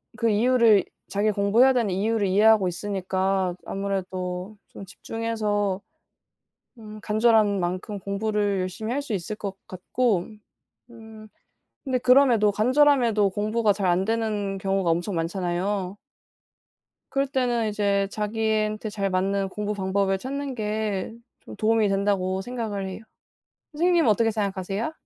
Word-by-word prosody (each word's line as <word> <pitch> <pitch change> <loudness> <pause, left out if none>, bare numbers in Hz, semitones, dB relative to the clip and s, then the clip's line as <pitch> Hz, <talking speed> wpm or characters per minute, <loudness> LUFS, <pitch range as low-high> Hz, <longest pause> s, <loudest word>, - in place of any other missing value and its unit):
그 230 +1 +1
이유를 225 -2 +4 0.2
자기가 210 +1 +1
공부해야 215 +7 +4
되는 235 -5 +1
이유를 205 +2 0
이해하고 205 +1 +4
있으니까 190 0 -1
아무래도 190 0 -4
좀 195 - -10
집중해서 210 -2 -2 1.0
음 215 -1 -10
간절한 215 -2 +3
만큼 185 +4 -3
공부를 205 0 -1
열심히 185 +5 -4
할 280 - 0
수 255 -6 -4
있을 195 +3 -4
것 200 -2 -6
같고 190 +1 -1 0.6
음 220 -2 -13 0.6
근데 260 -3 0
그럼에도 250 -5 +4
간절함에도 240 -3 +3
공부가 215 +2 +1
잘 200 -1 -2
안 180 +2 +2
되는 210 -3 -1
경우가 195 -2 0
엄청 175 +4 -1
많잖아요. 180 +3 -2 1.2
그럴 275 0 +1
때는 245 -4 0
이제 200 -1 0
자기한테 215 0 -1
잘 200 -2 -2
맞는 195 +1 0
공부 210 +1 -3
방법을 195 0 0
찾는 275 +4 -4
게 215 -2 -3 0.3
좀 - - -10
도움이 220 -1 +2
된다고 195 -1 0
생각을 215 -3 -4
해요. 190 +2 -7 0.7
선생님은 340 0 +2
어떻게 225 +2 +2
생각하세요? 200 - -3
210 Hz, 300 characters per minute, -25 LUFS, 195-225 Hz, 1.2 s, 이유를